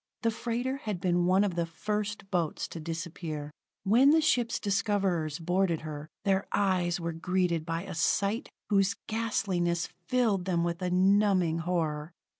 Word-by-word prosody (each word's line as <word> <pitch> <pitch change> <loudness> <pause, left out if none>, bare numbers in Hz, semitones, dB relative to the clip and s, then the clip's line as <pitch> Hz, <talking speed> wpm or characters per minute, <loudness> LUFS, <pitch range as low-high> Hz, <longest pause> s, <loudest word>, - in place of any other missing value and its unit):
The 230 - +3
freighter 245 +4 -2
had 210 -8 -4
been 175 -1 +1
one 190 +2 +4
of 200 -3 0
the 170 -1 -1
first 210 +3 -3
boats 170 -5 -1
to 165 - -7
disappear. 160 -2 -5 0.3
When 235 +8 +5
the 320 +2 +6
ship's 245 -7 +2
discoverers 195 -7 0
boarded 175 0 0
her, 155 -1 -6 0.2
their 195 0 +2
eyes 180 -3 +1
were 170 -1 -3
greeted 170 -1 0
by 165 +1 -2
a - - -7
sight 200 +6 0 0.2
whose 195 -1 +3
ghastliness 190 -6 0 0.2
filled 220 -8 +2
them 175 -3 +1
with 170 +1 -2
a 180 - 0
numbing 185 -2 +3
horror. 160 -2 -2
180 Hz, 155 wpm, -29 LUFS, 170-205 Hz, 0.3 s, the